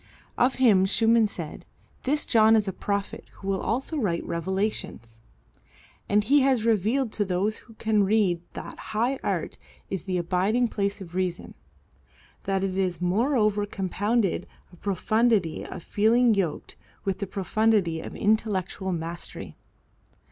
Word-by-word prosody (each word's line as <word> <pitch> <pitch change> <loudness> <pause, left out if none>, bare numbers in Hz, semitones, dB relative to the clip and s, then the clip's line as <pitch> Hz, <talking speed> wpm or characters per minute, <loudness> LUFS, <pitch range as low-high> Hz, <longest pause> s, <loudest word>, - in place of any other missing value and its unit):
Of 250 +2 +2
him 205 -7 +4
Schumann 225 +2 +4
said, 170 -6 -7 0.4
"This 295 +3 +1
John 220 -1 +5
is 210 -2 +2
a 190 - -2
prophet 200 +1 -3
who 195 - -10
will 195 -1 0
also 270 +7 -2
write 185 -10 -1
revelations," 170 - -3 0.9
and 205 +1 +3
he 280 +7 +4
has 260 -4 +2
revealed 225 +3 +1
to 210 - 0
those 195 +3 -1
who 225 - -17
can 215 -2 +2
read 195 -4 +2
that - - -8 0.2
high 250 +4 +1
art - - -2 0.3
is 190 -1 -3
the 185 -2 -1
abiding 195 +8 +1
place 200 -1 -2
of 175 -2 -10
reason, 180 -1 -2 0.9
that 195 0 0
it 190 -1 -2
is 180 -3 0
moreover 210 +2 +1
compounded 200 0 -1 0.3
of 175 - -18
profundity 210 -2 +1
of - - -8
feeling 230 +3 +3
yoked 185 -7 -2 0.3
with 195 0 -2
profundity 195 -4 +1
of - - -8
intellectual 195 -3 0
mastery. 170 0 -6
205 Hz, 140 wpm, -26 LUFS, 185-225 Hz, 0.9 s, John